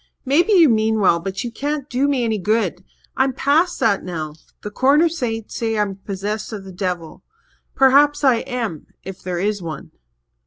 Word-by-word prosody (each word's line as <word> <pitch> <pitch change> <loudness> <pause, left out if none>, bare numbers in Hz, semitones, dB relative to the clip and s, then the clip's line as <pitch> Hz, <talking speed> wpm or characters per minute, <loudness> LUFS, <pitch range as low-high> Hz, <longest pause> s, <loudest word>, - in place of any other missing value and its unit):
"Maybe 340 +10 +3
you 345 -5 +7
mean 220 -2 +2
well 180 -4 +3
but 190 +3 -4
you 240 - -5
can't 290 +2 -3
do 270 +1 0
me 275 -4 +1
any 220 -2 0
good. 195 -2 0 0.3
I'm 265 0 +1
past 295 +7 +1
that 200 -3 +2
now. 160 -4 -5 0.3
The 210 - -5
Corner 280 +9 +4
saints 230 -9 -4
say 225 -1 -1
I'm 200 -2 -1
possessed 205 +3 -5
of 210 -3 -6
the 190 - -10
devil. 180 -3 -4 0.5
Perhaps 290 +2 +4
I 260 -4 +5
am 230 - -4 0.2
if 190 0 -9
there 180 -1 -4
is 205 +2 -1
one." 160 -4 -7
220 Hz, 180 wpm, -20 LUFS, 195-270 Hz, 0.5 s, you